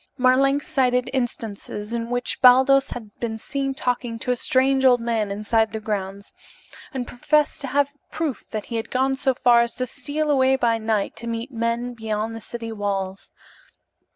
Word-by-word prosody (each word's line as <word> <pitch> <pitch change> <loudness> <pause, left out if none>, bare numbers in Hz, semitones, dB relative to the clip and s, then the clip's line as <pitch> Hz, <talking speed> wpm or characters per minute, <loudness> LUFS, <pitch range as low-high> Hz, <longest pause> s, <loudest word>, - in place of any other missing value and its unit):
Marlanx 275 +2 +3
cited 250 -4 +1
instances 225 -3 -4
in 230 0 -3
which 245 0 -1
Baldos 265 +2 +6
had 220 -4 -7
been 225 -2 -3
seen 275 +4 -3
talking 245 -2 -2
to 250 +2 -2
a - - +2
strange 265 +2 +3
old 250 -2 +6
man 230 -3 -1
inside 215 +2 0
the 220 - -3
grounds, 200 -2 -4 0.6
and 260 -4 -3
professed 300 +6 +1
to 275 - -3
have 285 +2 0
proof 315 -6 -4
that 215 -2 -4
he 230 - -4
had 225 - -4
gone 265 +1 +1
so 265 -1 +1
far 240 -1 +5
as 235 0 -1
to 255 - -1
steal 295 +4 -2
away 265 -1 +4
by 235 -3 +1
night 220 -2 -1
to 235 - -5
meet 230 +3 -4
men 235 +1 -2
beyond 220 -1 -3
the 225 - -7
city 230 +1 -6
walls. 195 -2 -3
240 Hz, 180 wpm, -23 LUFS, 225-265 Hz, 0.6 s, Baldos